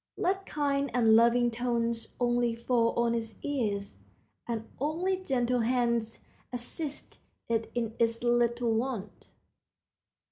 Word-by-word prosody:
Let 385 +2 0
kind 280 -2 0
and 225 -3 +5
loving 235 +1 +5
tones 235 -1 -1
only 240 -1 +2
fall 235 0 +1
on 235 0 +2
its 225 -1 -3
ears, 210 -8 -2 0.5
and 225 -2 -3
only 330 +7 0
gentle 250 -8 0
hands 235 -1 0 0.3
assist 275 +5 -5 0.3
it 225 -1 0
in 230 -2 -1
its 230 0 +1
little 240 -1 +2
wants. 225 -3 -3
240 Hz, 115 wpm, -30 LUFS, 230-255 Hz, 0.5 s, and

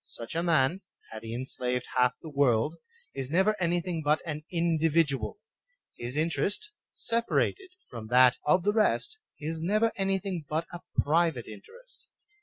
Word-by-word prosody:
Such 115 -1 -8
a 165 - 0
man, 165 +1 +2 0.3
had 110 -1 -7
he 115 +1 -6
enslaved 125 -1 -2
half 125 -1 +4
the 160 - -7
world, 140 -1 +2 0.4
is 135 -1 -4
never 190 +7 +3
any 175 0 +2
thing 170 -2 -3
but 150 +1 +3
an 155 -2 -4
individual; 165 - +1 0.6
his 120 +4 -5
interest, 190 - 0 0.2
separated 235 +11 0 0.2
from 115 -3 -8
that 125 +1 +6
of 175 +4 +3
the 205 +2 +2
rest, 410 - +1 0.2
is 160 +2 -4
never 215 +6 +2
anything 195 -3 -1
but 160 +2 -1
a 175 - -5 0.2
private 160 -5 +2
interest. 485 - -13
160 Hz, 150 wpm, -29 LUFS, 130-190 Hz, 0.6 s, that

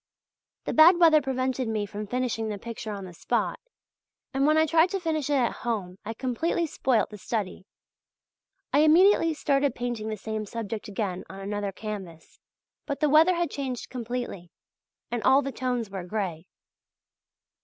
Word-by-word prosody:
The - - -2
bad 335 +3 +8
weather 320 -3 +6
prevented 260 -1 -1
me 215 -2 -1
from 210 +1 -6
finishing 240 -2 -1
the 210 - -3
picture 225 +1 -6
on 200 -2 -6
the 180 - -10
spot, - - -1 0.7
and 275 +2 +2
when 310 +1 +4
I 315 - +5
tried 325 +3 +4
to 390 +1 -2
finish 315 -5 -1
it 290 - +2
at 250 -4 +1
home 195 -6 -3
I 225 - -5
completely 265 +8 -1
spoilt 260 -8 0
the 210 - -9
study. 200 -2 -4 1.1
I 285 - +5
immediately 330 +1 +5
started 280 -3 +1
painting 240 -3 -3
the 215 - -3
same 215 +1 -4
subject 225 0 -5
again 195 -3 -3
on 195 - -9
another 205 0 -3
canvas; 190 -6 -8 0.5
but 280 -2 -3
the 300 - +2
weather 320 +5 +6
had 340 -3 -1
changed 260 -4 -4
completely, 240 -7 -5 0.6
and 240 -1 -1
all 270 +4 +5
the 275 - -3
tones 245 -5 -2
were 190 -2 -5
grey. 180 -3 -4
240 Hz, 165 wpm, -27 LUFS, 210-290 Hz, 1.1 s, bad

